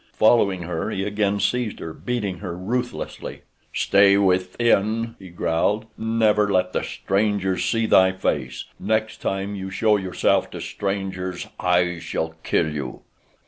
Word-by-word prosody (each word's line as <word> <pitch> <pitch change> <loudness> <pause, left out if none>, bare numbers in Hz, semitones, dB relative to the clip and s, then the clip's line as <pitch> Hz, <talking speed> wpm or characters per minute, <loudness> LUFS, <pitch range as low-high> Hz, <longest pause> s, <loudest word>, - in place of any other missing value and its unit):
Following 100 -5 +3
her 85 -1 -3
he 95 - -2
again 105 0 0
seized 110 +2 0
her, 80 - -6
beating 105 -7 -3
her 90 -4 -5
ruthlessly. 120 +7 -4 0.3
"Stay 100 0 +4
within!" 105 +4 +1
he 95 -2 -11
growled. 85 +5 0
"Never 110 -2 +2
let 90 -1 +1
the - - 0
strangers 100 -2 0
see 115 -1 +1
thy 95 -3 +5
face. 65 -9 -2
Next 110 0 0
time 95 +1 -2
you 95 -1 -5
show 105 +3 +2
yourself 95 -2 +1
to - - -7
strangers 95 -2 -3
I 90 -1 +2
shall 80 0 -3
kill 80 -2 +1
you!" 70 -4 -5
100 Hz, 140 wpm, -23 LUFS, 90-110 Hz, 0.3 s, thy